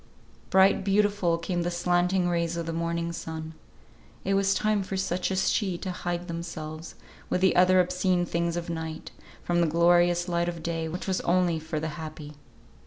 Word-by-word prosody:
Bright, 190 +1 +4
beautiful 200 -3 +2
came 175 +1 -2
the 175 - -1
slanting 175 +1 +1
rays 170 -1 0
of 170 - -3
the 165 - -3
morning 170 0 -2
sun. 160 -1 -6 0.7
It 195 - +1
was 195 0 +2
time 215 -1 +1
for 195 0 -4
such 180 -1 -1
as 190 0 +1
she 190 -5 0
to 185 +1 -4
hide 175 0 -4
themselves, 165 -2 -6 0.3
with 180 - 0
the 190 - +4
other 185 +1 +5
obscene 180 0 +1
things 170 0 -1
of 170 - -4
night, 160 -1 -5 0.3
from 175 0 +1
the 170 - +3
glorious 175 +2 +3
light 170 0 0
of 170 -2 -7
day, 165 -1 -2
which 175 +3 -5
was 190 -1 -1
only 175 -2 +2
for 160 0 -4
the 160 +1 -3
happy. 155 -1 -8
175 Hz, 180 wpm, -27 LUFS, 165-185 Hz, 0.7 s, other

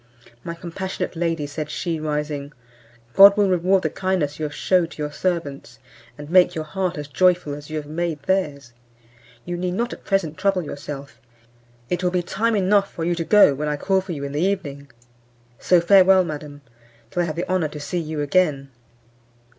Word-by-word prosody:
"My 170 - -5
compassionate 180 +2 -5
lady," 165 -2 -1
said 150 +1 -5
she, 165 0 -3
rising, 150 -1 -3 0.6
"God 200 +1 +8
will 205 -1 +4
reward 185 +1 +2
the - - 0
kindness 180 -6 -1
you 155 - -1
have 150 - -5
shewed 180 +1 +2
to - - -13
your 150 - -4
servants, 145 -8 -3 0.4
and 145 - -9
make 180 +2 +4
your 160 - -2
heart 185 +2 -3
as 145 -1 -5
joyful 180 -1 +2
as 145 +1 -9
you 155 - -4
have 150 - -5
made 155 -1 -3
theirs. 145 -9 -1 0.7
You 175 - -4
need 180 0 -2
not 235 +4 -2
at - - -12
present 185 -5 -1
trouble 195 -2 +1
yourself; 140 -1 -8 0.7
it 180 +5 -2
will 180 - +2
be 180 0 -1
time 220 +6 0
enough 200 0 +2
for 165 - -5
you 175 - +1
to 170 -1 -2
go 205 -4 +6
when 150 +2 -3
I 150 0 -1
call 190 +5 +1
for 185 -2 -6
you 140 -3 -6
in 140 - -4
the 145 +2 -2
evening. 150 -8 -2 0.7
So 180 - +4
farewell, 190 +1 +6
madam, 150 -3 -7 0.5
till 175 - 0
I - - +1
have 155 - -4
the 170 - -3
honour 185 -4 +1
to 150 0 -9
see 145 +5 -3
you 155 -2 -4
again." 145 -3 +1
170 Hz, 195 wpm, -22 LUFS, 150-185 Hz, 0.7 s, God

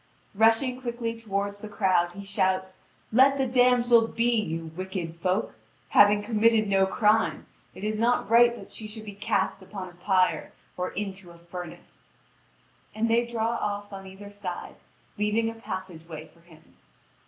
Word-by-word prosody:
Rushing 225 +4 +3
quickly 235 -2 -3
toward 200 -3 -3
the 210 +1 -9
crowd, 185 -4 +1
he 200 +2 -9
shouts: 190 -1 0 0.3
"Let 265 +4 +5
the 270 - +1
damsel 245 -2 +4
be, 235 +1 0
you 165 -7 -2
wicked 185 -3 -5
folk! 185 +5 -1 0.4
Having 205 0 +5
committed 220 0 +3
no 195 -1 +3
crime, 215 +3 +2 0.3
it - - -10
is 215 0 -1
not 240 0 +2
right 235 +2 +5
that - - -12
she 215 - -6
should 215 0 -7
be 205 - -7
cast 195 -1 -1
upon 190 -1 -8
a - - -16
pyre 185 +1 +1 0.2
or 180 0 -2
into 190 -2 -5
a 170 - -14
furnace." 170 0 -10 0.9
And 225 +1 0
they 235 +1 +3
draw 230 -1 -1
off 205 -3 -3
on 195 0 -8
either 200 +2 -11
side, 200 -3 -7 0.4
leaving 220 +2 +1
a 225 0 -14
passage 185 -5 -7
way 155 -1 -8
for 170 - -24
him. 165 -2 -21
205 Hz, 165 wpm, -27 LUFS, 185-230 Hz, 0.9 s, Let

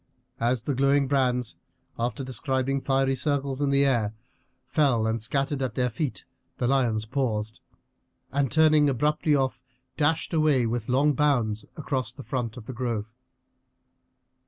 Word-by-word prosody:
As 120 0 +1
the 140 - -1
glowing 140 +1 +3
brands, 125 -3 0 0.4
after 120 +3 -2
describing 130 +2 -1
fiery 135 0 +1
circles 140 0 -1
in 140 - +2
the 140 0 +3
air, 115 -6 +1 0.5
fell 130 -6 +2
and 110 0 -1
scattered 135 +4 -1
at 130 - -2
their 125 -1 0
feet, 140 +3 -3 0.3
the 120 - 0
lions 120 -5 +1
paused, 110 -3 -2 0.7
and 140 -1 +1
turning 155 -2 +5
abruptly 150 +3 +1
off 135 -2 0 0.4
dashed 160 +3 +1
away 155 -6 +3
with 115 0 -2
long 140 +4 +3
bounds 120 -8 +1
across 130 -6 -2
the 135 - -10
front 125 -3 -3
of 115 - -9
the 130 - -6
grove. 115 -3 -3
130 Hz, 145 wpm, -26 LUFS, 120-140 Hz, 0.7 s, turning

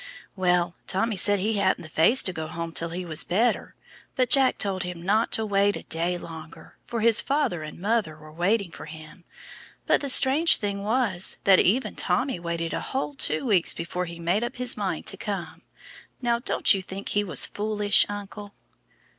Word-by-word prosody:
Well, 180 -2 +1
Tommy 220 +3 -1
said 205 +2 +4
he 210 +3 -1
hadn't 190 -1 +1
the - - -9
face 165 +11 +4
to 185 - -2
go 160 -2 -5
home 165 +1 -5
till 165 +1 -1
he 180 +2 -5
was 160 -2 0
better, 225 +7 0 0.4
but 255 -2 0
Jack 270 -2 +4
told 195 -2 -2
him 180 -1 -6
not 215 +5 +1
to 220 - 0
wait 200 0 +1
a - - -7
day 170 +2 -1
longer, 160 -1 -11
for 230 -2 -3
his 230 -1 +4
father 275 - -1
and 155 +1 -9
mother 200 -5 -1
were 155 0 -14
waiting 185 +3 0
for - - -10
him; 155 +2 -12 0.6
but - - +2
the 280 - -1
strange 280 +6 +6
thing 200 -1 -4
was 210 -4 +1
that 195 -1 +5
even 240 +8 +2
then - - -23
Tommy 260 -6 -1
waited 170 -1 -4
a - - -3
whole 275 +2 -3
two 275 - -2
weeks 195 -8 +2
before 180 +2 -4
he 170 -1 -9
made 175 +6 0
up 240 +1 -4
his 250 0 -1
mind - - -3
to - - -2
come. - - -6 0.6
Now 235 -2 0
don't 235 - +2
you 195 - -2
think 190 +2 -8
he 205 - +1
was 170 -9 +2
foolish, 210 -1 +1
uncle?" 205 0 -8
195 Hz, 195 wpm, -25 LUFS, 170-225 Hz, 0.6 s, strange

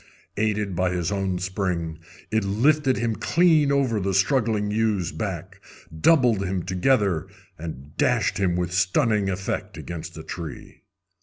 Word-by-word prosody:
Aided 105 -3 0
by 90 +1 +1
his 85 +1 -1
own 95 -2 -1
spring, 90 -4 -2 0.3
it 110 -1 +2
lifted 130 +7 +2
him 115 -2 -1
clean 160 -5 +3
over 130 -6 +2
the 95 -1 -1
struggling 105 -1 +2
ewe's 105 -5 0
back, 95 -2 -5 0.3
doubled 120 - +4
him 95 -2 -2
together, 95 - +1 0.3
and 75 -3 -8
dashed - - +1
him 90 -3 +1
with 90 -1 -2
stunning 100 - +2
effect 95 0 -3
against 85 -2 -7
a - - -7
tree. 80 -4 -8
100 Hz, 140 wpm, -24 LUFS, 90-115 Hz, 0.3 s, doubled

